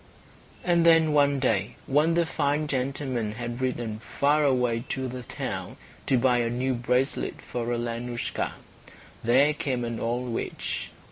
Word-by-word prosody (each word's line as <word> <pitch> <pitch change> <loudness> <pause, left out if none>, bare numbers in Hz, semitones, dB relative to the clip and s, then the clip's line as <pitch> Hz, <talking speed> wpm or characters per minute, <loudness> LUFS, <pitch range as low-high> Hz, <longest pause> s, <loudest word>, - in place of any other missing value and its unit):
And 170 -1 +3
then 165 -2 +6
one 145 -1 +4
day, 110 -6 0
when 150 +4 +3
the 170 0 +3
fine 150 -1 0
gentleman 130 -5 -2
had 120 +2 -5
ridden 120 -4 -2
far 145 +6 +1
away 125 -4 +2
to 130 -1 -2
the 125 0 -6
town 120 - -5 0.3
to 130 - +4
buy 125 0 +3
a 120 -1 +1
new 130 +2 0
bracelet 125 +3 0
for 120 -1 -4
Alenoushka, 120 0 -2 0.7
there 135 +6 +5
came 130 -5 -2
an 115 -1 -3
old 120 +1 -2
witch. - - -3
125 Hz, 145 wpm, -27 LUFS, 120-145 Hz, 0.7 s, then